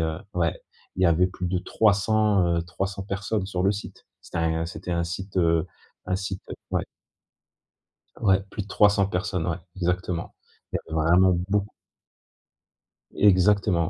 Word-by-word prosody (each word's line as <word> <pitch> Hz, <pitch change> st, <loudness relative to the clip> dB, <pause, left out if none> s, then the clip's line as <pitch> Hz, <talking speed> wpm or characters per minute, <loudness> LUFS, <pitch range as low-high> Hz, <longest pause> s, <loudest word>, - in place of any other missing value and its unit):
heu 80 Hz, -1 st, -1 dB, 0.2 s
ouais. 85 Hz, -2 st, 0 dB, 0.4 s
Il 95 Hz, -, 0 dB
y -, -, +6 dB
avait 85 Hz, +2 st, +4 dB
plus 90 Hz, 0 st, -5 dB
de 90 Hz, +1 st, 0 dB
300, 105 Hz, 0 st, +2 dB
heu 85 Hz, -, 0 dB
300 95 Hz, +3 st, -4 dB
personnes 100 Hz, +1 st, -2 dB
sur 90 Hz, -2 st, -2 dB
le 100 Hz, -, +4 dB
site. 105 Hz, -, -8 dB, 0.2 s
C'était -, -, -6 dB
un 80 Hz, 0 st, 0 dB
c'était 90 Hz, 0 st, -6 dB
un 85 Hz, 0 st, +1 dB
site, 95 Hz, +3 st, -6 dB
heu 85 Hz, -2 st, +3 dB, 0.4 s
un 95 Hz, -, 0 dB
site 95 Hz, 0 st, -4 dB
heu -, -, -4 dB, 0.2 s
ouais. -, -, +1 dB, 1.4 s
Ouais, 95 Hz, -3 st, +4 dB
plus 105 Hz, -, -4 dB
de -, -, -16 dB
300 100 Hz, -1 st, +4 dB
personnes, 90 Hz, -2 st, -2 dB
ouais, 85 Hz, -, -1 dB, 0.2 s
exactement. 90 Hz, -1 st, -2 dB, 0.4 s
Il -, -, 0 dB
y -, -, -6 dB
avait 80 Hz, -, +1 dB
vraiment 90 Hz, +2 st, +6 dB, 0.2 s
beauc 100 Hz, 0 st, +1 dB, 1.5 s
Exactement, 95 Hz, -3 st, +4 dB
95 Hz, 160 wpm, -25 LUFS, 85-100 Hz, 1.5 s, y